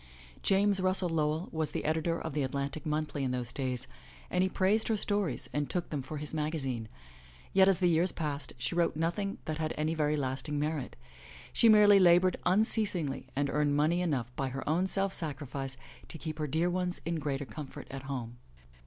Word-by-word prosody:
James 195 0 +3
Russell 185 -1 +3
Lowell 155 +1 0
was 160 -1 -1
the - - -4
editor 160 +2 0
of - - -5
the 150 - 0
Atlantic 140 +3 -3
Monthly 150 -1 -1
in 130 - 0
those 125 -1 -3
days 130 -2 -2 0.5
and 180 - +2
he 190 - +2
praised 200 +4 +2
her 220 - +1
stories 200 - -1
and 145 -1 -1
took 175 -2 -3
them 145 -3 -2
for 140 +4 -6
his 150 +1 -5
maga 155 +1 -1
zine. 125 -6 -3 0.7
Yet, 190 0 +6
as 195 -2 +5
the 180 - +2
years 170 +2 +3
passed, 145 -3 -4
she 125 +4 -2
wrote 170 -2 +1
nothing 175 +6 -1
that 155 0 -3
had 155 -1 -2
any 155 +1 0
very 150 -1 +1
lasting 135 +2 -2
merit. 150 -3 -2 0.6
She 230 - +5
merely 205 -2 +7
labored 180 0 +5
unceasingly 185 -7 +2
and 140 +1 +1
earned 145 -1 +2
money 160 +4 +2
enough 125 -8 -1
by 135 -1 -1
her 135 +1 -6
own 170 +5 +2
self 195 0 0
sacrifice 140 -4 -3 0.3
to - - -7
keep 155 -1 -6
her 150 - -1
dear 160 +5 +1
ones 180 0 -1
in 165 0 -1
greater 145 -1 -2
comfort 135 +5 -8
at 135 0 -5
home. 120 -3 -5
155 Hz, 195 wpm, -31 LUFS, 140-180 Hz, 0.7 s, merely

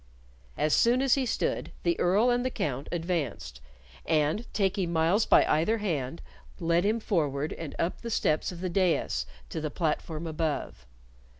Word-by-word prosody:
As 150 -1 +1
soon 240 +2 +4
as 270 - +4
he 265 -2 +1
stood, - - -1
the 340 -1 +1
Earl 205 +8 +3
and 245 0 +1
the 255 - 0
Count 140 - -3
advanced, 150 - -3 0.4
and 160 +8 0
taking 190 -3 0
Myles 170 +6 +2
by - - +6
either 170 +9 +2
hand, 140 - -3 0.4
led 170 +1 +2
him 215 +3 +1
forward 150 -8 -1
and 160 -4 -7
up 170 - -2
the 235 - -5
steps 155 -8 +1
of 175 -1 -9
the 185 - -1
dais 170 - +1 0.2
to 160 - -4
the 155 - -2
platform 160 +1 -2
above. 160 - -3
170 Hz, 165 wpm, -28 LUFS, 150-205 Hz, 0.4 s, by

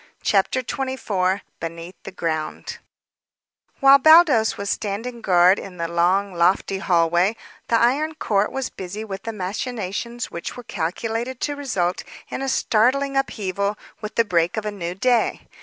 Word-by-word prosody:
CHAPTER 210 +6 +2
XXIV 215 -8 -1 0.2
BENEATH 165 +2 -6
THE - - -6
GROUND 160 -4 -4 1.0
While 275 0 +8
Baldos 315 -7 +6
was 200 0 -2
standing 225 +4 -4
guard 180 0 +5
in 185 -2 -9
the 170 0 -2
long, 180 +4 +1
lofty 185 +3 +1
hallway 175 +3 +2 0.3
the 230 - +2
Iron 295 +7 +2
Count 210 -8 0
was 270 -1 -3
busy 200 +4 -6
with 195 -2 -6
the 225 - -5
machinations 220 +3 -4
which 170 - -6
were 245 - -8
calculated 225 +8 -3
to 290 - -1
result 190 -11 -1 0.3
in - - -4
a 270 - -1
startling 265 +4 +2
upheaval 200 -6 -1 0.2
with 215 0 -6
the 230 - +3
break 175 -1 +1
of 215 - -2
a 210 - -2
new 175 -3 -5
day. 240 +3 +1
205 Hz, 150 wpm, -22 LUFS, 180-245 Hz, 1.0 s, While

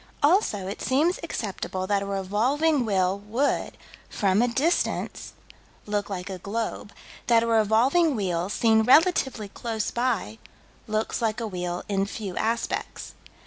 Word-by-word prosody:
Also 290 - +3
it 195 +2 -6
seems 310 +8 +1
acceptable 195 - -4
that 200 0 +1
a 200 - -4
revolving 240 +10 +1
wheel 190 -1 +1
would, 230 +8 -1 0.3
from 200 0 +2
a 245 - +3
distance, 285 +9 -1 0.5
look 205 -1 -2
like 185 -2 -5
a 190 -2 -6
globe; 205 +1 -4 0.4
that 230 -1 +4
a - - 0
revolving 230 +8 +3
wheel, 180 -4 -1
seen 220 +1 +3
relatively 265 - +3
close 220 0 -3
by, 230 - -1 0.5
looks 215 +2 -1
like 225 0 0
a 230 - -3
wheel 180 -3 -4
in 195 -1 0
few 200 -2 -6
aspects. 230 +1 -2
220 Hz, 140 wpm, -25 LUFS, 195-245 Hz, 0.5 s, that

